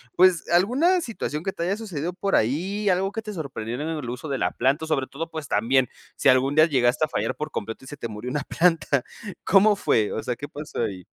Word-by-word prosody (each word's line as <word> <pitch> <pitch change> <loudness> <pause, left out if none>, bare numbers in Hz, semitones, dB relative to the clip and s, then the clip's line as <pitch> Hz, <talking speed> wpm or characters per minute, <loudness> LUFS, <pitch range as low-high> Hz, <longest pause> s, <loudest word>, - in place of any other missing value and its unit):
pues 180 -4 +4
alguna 260 - +3
situación 175 - -4
que 195 - -1
te 170 - -5
haya 185 +3 0
sucedido 180 -6 -4
por 195 +2 0
ahí, 185 - 0
algo 190 +2 +1
que 225 +1 -5
te 210 -1 -6
sorprendiera 135 - -5
en 160 - -3
el 140 -5 -5
uso 125 +5 -6
de 135 - -1
la - - 0
planta, 135 +6 +1
sobre 145 -4 0
todo, 165 +5 -6
pues 155 -3 -6
también 125 +4 +2 0.3
si - - +3
algún 130 +2 +4
día 155 +1 +6
llegaste 130 +1 +2
a - - -10
fallar - - -2
por 150 0 -4
completo 115 +1 -5
y - - -12
se 145 - -8
te 120 - -4
murió 110 +2 -6
una 145 +3 -2
planta 165 -6 +2 0.4
¿cómo 205 +2 +5
fue? 110 - +1
o - - -2
sea, 125 -2 -2
¿qué 145 - -7
pasó 145 -4 -6
ahí? 95 -5 -4
150 Hz, 235 wpm, -24 LUFS, 130-185 Hz, 0.4 s, día